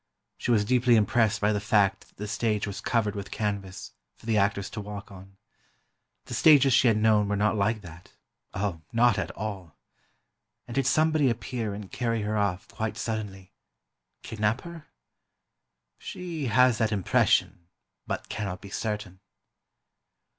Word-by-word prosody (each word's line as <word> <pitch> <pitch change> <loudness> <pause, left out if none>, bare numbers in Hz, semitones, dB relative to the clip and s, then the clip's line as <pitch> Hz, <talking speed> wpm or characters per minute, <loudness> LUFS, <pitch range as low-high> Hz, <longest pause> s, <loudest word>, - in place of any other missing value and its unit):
She - - -4
was 110 -4 +3
deeply 125 +1 +3
impressed 110 0 +2
by 105 +1 +2
the 105 - 0
fact 100 -3 +2
that - - -29
the 105 - -5
stage 110 -1 -1
was 100 -2 -6
covered 110 -4 0
with 100 -1 -6
canvas, 100 -3 -4 0.2
for - - -19
the 115 -1 +1
actors 100 -1 +1
to 110 - -5
walk 100 0 -8
on. 95 0 -13 0.9
The - - -8
stages 135 +2 +6
she 125 - +5
had 110 -2 +4
known 105 -1 +3
were 105 - 0
not 105 +2 +1
like 105 +2 0
that—oh, 90 +1 -8
not 115 -3 +3
at - - -3
all. 95 -6 -6 0.9
And 120 - -7
did 135 0 +1
somebody 155 -1 +3
appear 115 -2 -3
and 100 -2 -9
carry 115 -3 -1
her 105 +1 -2
off, 100 -3 -1
quite 110 0 -4
suddenly—kidnap 105 +1 -5
her? 170 -2 -10 1.1
She 170 -6 -5
has 120 +1 +4
that 110 -2 +1
impression, 95 -2 +1 0.4
but - - -4
cannot 95 -3 -4
be 100 -1 -12
certain. 105 -4 -4
105 Hz, 150 wpm, -27 LUFS, 100-115 Hz, 1.1 s, stages